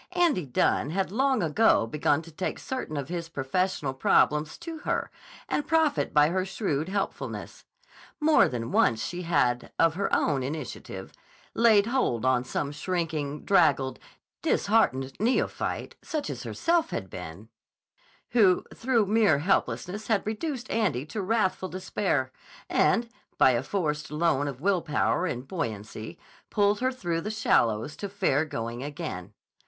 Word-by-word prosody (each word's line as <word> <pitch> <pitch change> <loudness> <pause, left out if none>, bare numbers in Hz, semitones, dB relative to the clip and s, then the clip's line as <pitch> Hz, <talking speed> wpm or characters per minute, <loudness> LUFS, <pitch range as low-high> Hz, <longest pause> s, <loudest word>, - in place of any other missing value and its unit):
Andy 335 - +2
Dunne 130 +3 +1
had 190 +3 -1
long 260 0 +2
ago 165 - +3
begun 145 +5 +1
to 165 - -13
take 185 +4 -3
certain 255 - -4
of 140 -2 -3
his 170 -1 -4
professional 145 0 -1
problems 150 +3 +2
to 335 -2 -7
her - - -2 0.4
and 295 - -1
profit 320 -3 +2
by 150 0 +5
her 185 +2 0
shrewd 185 -5 -2
helpfulness. 200 0 -4 0.5
More 310 0 +5
than 115 -2 -4
once 115 0 +3
she 175 0 -4
had, 135 -8 +1
of 165 -1 +4
her 195 +4 -2
own 140 -4 +2
initiative, 140 +1 -6 0.4
laid 220 -3 +5
hold 230 - 0
on 130 -1 +3
some 140 +2 -3
shrinking, 155 -2 -3
draggled, 135 -9 +3 0.4
disheartened 135 -12 +2
neophyte, 235 +5 -1
such 310 -2 -3
as - - -6
she - - -7
herself 335 0 +1
had 95 - -4
been, 90 +4 -9 0.8
who 200 -7 +4
through 235 -3 +1
mere 210 -6 +4
helplessness 195 +4 -1
had 220 -3 +1
reduced 250 +4 -3
Andy 185 - 0
to 210 +7 -4
wrathful 190 -2 0
despair, 185 -7 -1 0.4
and, 235 0 +2 0.3
by 130 - +6
a 120 -1 +1
forced 150 -1 -2
loan 150 -2 +1
of 135 -3 -5
will 185 +2 +2
power 165 +3 0
and 125 -4 -4
buoyancy, 110 - -5 0.3
pulled 205 0 +2
her 255 +1 +1
through 175 -10 -2
the 210 - -4
shallows 120 - +1
to 200 - -5
fair 190 -8 +1
going 115 -4 -5
again. 140 - -6
170 Hz, 150 wpm, -27 LUFS, 135-210 Hz, 0.8 s, by